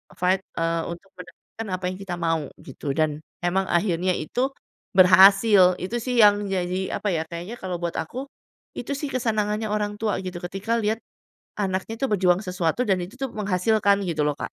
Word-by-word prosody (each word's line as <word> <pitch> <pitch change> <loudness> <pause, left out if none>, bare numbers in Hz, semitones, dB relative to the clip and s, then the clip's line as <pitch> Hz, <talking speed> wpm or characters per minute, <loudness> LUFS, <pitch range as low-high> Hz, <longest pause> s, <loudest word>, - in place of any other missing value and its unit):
fight, 185 +1 +2 0.2
eee, 165 0 0
untuk 175 +3 -9
mendapatkan 180 +5 -10
apa 185 - -10
yang 185 - -7
kita 195 -3 -5
mau, 165 -3 -1
gitu, 135 +1 -5
dan 155 -2 +1 0.3
memang 190 +2 +1
akhirnya 180 0 +1
itu 250 - -1 0.5
berhasil, 190 0 +7
itu 190 +7 -3
sih 250 +1 -2
yang 205 -1 +6
jadi 185 0 -1
apa - - -3
ya, 160 -1 0
kayaknya 175 +7 -6
kalau 185 -2 -3
buat 170 -1 -2
aku, 255 - -4 0.5
itu 245 - -5
sih 290 0 -4
kesenangannya 215 -3 0
orang 210 0 -1
tua 215 -3 0
gitu, 185 -1 -5
ketika 195 +6 -2
liat 215 +1 0 0.6
anaknya 190 +1 -2
tuh 270 - +1
berjuang 180 -1 +3
sesuatu 180 +3 0
dan 195 -5 +2
itu 180 +6 -7
tuh 270 -1 -4
menghasilkan 200 0 +2
gitu 165 -4 -2
loh, 145 - -2
Kak. - - -6
190 Hz, 180 wpm, -24 LUFS, 175-210 Hz, 0.6 s, berhasil